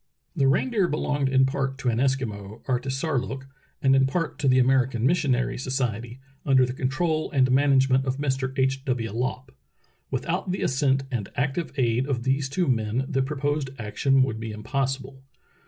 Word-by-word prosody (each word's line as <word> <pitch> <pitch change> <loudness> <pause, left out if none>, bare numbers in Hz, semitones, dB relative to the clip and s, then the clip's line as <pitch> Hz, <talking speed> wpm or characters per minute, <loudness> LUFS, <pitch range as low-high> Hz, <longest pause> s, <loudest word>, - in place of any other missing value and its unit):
The 135 - +3
reindeer 200 - +2
belonged 145 -3 0
in 130 0 +4
part 135 0 -2
to 130 -2 -1
an 115 0 0
Eskimo, 115 -6 -2
Artisar 135 +3 -1
look, 130 +1 -6 0.4
and 135 0 +5
in 135 0 +4
part 165 +4 -2
to 145 - 0
the 130 0 +5
American 130 -2 +2
Missionary 135 -6 +1
Society, 125 -2 -3 0.2
under 130 -2 +4
the 125 - -4
control 155 +5 -1
and 130 -2 +2
management 135 -1 +3
of 130 0 -1
Mr. 135 -2 -1
H. 135 0 +1
W. 120 -4 -1
Lopp. 130 +2 -3 0.6
Without 170 +9 -2
the 185 - -2
assent 135 0 +1
and 115 -6 -3
active 140 +6 -1
aid 125 0 +1
of 125 -4 -1
these 135 +1 0
two 175 +5 0
men 115 +1 0
the 135 -3 0
proposed 145 0 -1
action 130 +5 +2
would 110 -4 -2
be 115 0 -5
impossible. 130 +4 -3
130 Hz, 170 wpm, -25 LUFS, 125-140 Hz, 0.6 s, and